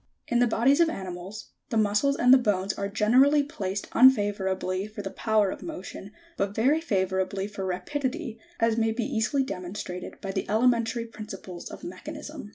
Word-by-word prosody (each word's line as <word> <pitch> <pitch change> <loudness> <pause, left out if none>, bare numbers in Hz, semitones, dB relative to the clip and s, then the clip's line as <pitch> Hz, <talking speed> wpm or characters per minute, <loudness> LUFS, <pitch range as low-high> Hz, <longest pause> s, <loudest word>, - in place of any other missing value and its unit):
70. - - -4
In 240 - +4
the 245 -2 +2
bodies 270 +6 +4
of 335 -1 +5
animals, 190 - -7 0.2
the 225 - -1
muscles 215 +6 +2
and 250 -1 +5
the - - +9
bones 200 -4 0
are 200 - -3
generally 255 +8 +4
placed 200 -8 -4
unfavourably 200 -5 +3
for 210 -1 -8
the 195 - -5
power 215 -3 +1
of - - -7
motion, 200 - -8 0.3
but 200 +1 -1
very 275 +8 +3
favourably 190 - -1
for 200 -2 -5
rapidity, 255 - -3 0.2
as 230 0 +2
may 225 -1 +2
be 235 +2 -2
easily 270 +5 0
demonstrated 180 -4 -6
by 195 - -4
the - - -3
elementary 230 +1 +2
principles 195 -5 -8
of - - -10
mechanism. 295 - -8
215 Hz, 170 wpm, -27 LUFS, 195-250 Hz, 0.3 s, the